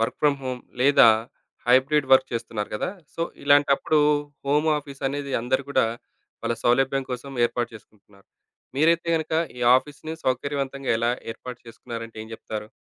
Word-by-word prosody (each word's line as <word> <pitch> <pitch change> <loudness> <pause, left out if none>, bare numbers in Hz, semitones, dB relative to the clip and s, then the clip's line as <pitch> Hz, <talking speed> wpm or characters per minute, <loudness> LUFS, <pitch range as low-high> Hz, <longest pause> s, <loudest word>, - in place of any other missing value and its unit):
Work 115 - -1
from 145 -2 +3
home 130 -1 -4 0.2
లేదా, 135 -2 +7 0.6
hybrid 135 +3 +4
work 130 0 +6
చేస్తున్నారు 115 -2 -4
గదా! 105 - -2 0.2
సో, 165 - -2 0.2
ఇలాంటప్పుడు 145 +1 +4 0.5
హోమాఫీసనేది 145 -2 -1
అందరూ 130 +2 0
గూడా, 125 - +3 0.6
వాళ్ళ 115 0 0
సౌలభ్యం 135 +2 +2
కోసం 130 +3 -6 0.2
ఏర్పాటు 120 0 -3
చేసుకుంటున్నారు. 105 -2 -18 0.5
మీరైతే 170 +3 +3
గనక, 160 0 -4 0.3
ఈ - - -7 0.2
ఆఫీస్‌ని 150 +3 -5
సౌకర్యవంతంగా 135 +1 -2
ఎలా 115 +1 +1 0.2
ఏర్పాటు 125 +2 -9
చేసుకున్నారంటే, 115 0 -8
ఏం - - -13
జెప్తారు? 105 -1 -7
135 Hz, 130 wpm, -24 LUFS, 120-145 Hz, 0.6 s, లేదా